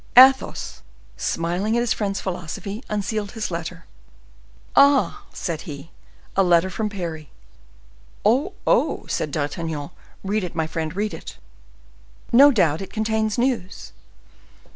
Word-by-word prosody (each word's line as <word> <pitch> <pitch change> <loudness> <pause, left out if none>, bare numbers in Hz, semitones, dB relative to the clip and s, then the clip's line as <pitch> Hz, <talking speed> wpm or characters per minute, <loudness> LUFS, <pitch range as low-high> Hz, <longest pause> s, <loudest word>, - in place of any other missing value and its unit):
Athos, 265 +1 +6 0.3
smiling 180 +7 -1
at - - +2
his 240 - +1
friend's 200 -2 -2
philosophy, 195 +5 -5
unsealed 210 0 -2
his 220 -5 -3
letter. 170 +1 -5 0.9
"Ah!" 285 +9 +4
said 170 -3 -4
he, 145 +2 -8 0.4
"a 195 - +4
letter 180 0 +4
from 215 +2 -2
Parry." 165 -7 -5 1.0
"Oh! 270 - +3
oh!" - - +2
said 150 - -1
D'Artagnan; 150 +1 -3 0.3
"read 205 +1 0
it, 175 -2 -5
my 160 -1 0
friend, 160 +1 -4
read 210 +1 -1
it! - - -9 0.9
No 275 +5 +8
doubt 170 - +2
it 195 - -7
contains 220 -1 0
news." 240 -7 -1
195 Hz, 125 wpm, -23 LUFS, 165-220 Hz, 1.0 s, No